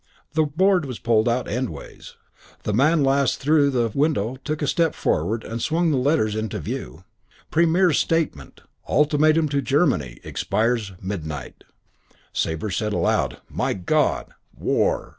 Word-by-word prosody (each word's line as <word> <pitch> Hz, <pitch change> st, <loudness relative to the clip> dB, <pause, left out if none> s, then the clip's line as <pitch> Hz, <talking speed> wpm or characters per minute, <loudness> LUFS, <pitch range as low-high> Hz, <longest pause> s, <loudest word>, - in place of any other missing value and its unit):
The 160 Hz, 0 st, +3 dB
board 180 Hz, +3 st, +2 dB
was 125 Hz, -4 st, -5 dB
pulled 115 Hz, 0 st, +2 dB
out 120 Hz, +2 st, 0 dB
endways. 115 Hz, -, -6 dB, 0.5 s
The 105 Hz, -, -1 dB
man 150 Hz, +7 st, +3 dB
last 135 Hz, -1 st, +2 dB
through 145 Hz, 0 st, +3 dB
the 120 Hz, -4 st, 0 dB
window 135 Hz, -6 st, 0 dB
took 155 Hz, 0 st, -3 dB
a -, -, 0 dB
step 165 Hz, +1 st, +1 dB
forward 110 Hz, +2 st, 0 dB
and 115 Hz, +1 st, -5 dB
swung 165 Hz, +3 st, +1 dB
the 140 Hz, -, +1 dB
letters 125 Hz, -5 st, +1 dB
into 110 Hz, -1 st, -3 dB
view. 80 Hz, -2 st, -6 dB, 0.5 s
PREMIER'S 170 Hz, 0 st, +3 dB
STATEMENT 155 Hz, -, -1 dB, 0.3 s
ULTIMATUM 155 Hz, +1 st, +3 dB
TO 140 Hz, 0 st, 0 dB
GERMANY 130 Hz, -, +1 dB
EXPIRES 110 Hz, -3 st, -1 dB
MIDNIGHT 80 Hz, -8 st, -6 dB, 0.7 s
Sabre 80 Hz, +6 st, -2 dB
said 105 Hz, +2 st, -1 dB
aloud, -, -, 0 dB
"My -, -, -1 dB
God! 90 Hz, -2 st, 0 dB, 0.3 s
War!" -, -, 0 dB
130 Hz, 140 wpm, -23 LUFS, 105-155 Hz, 0.7 s, The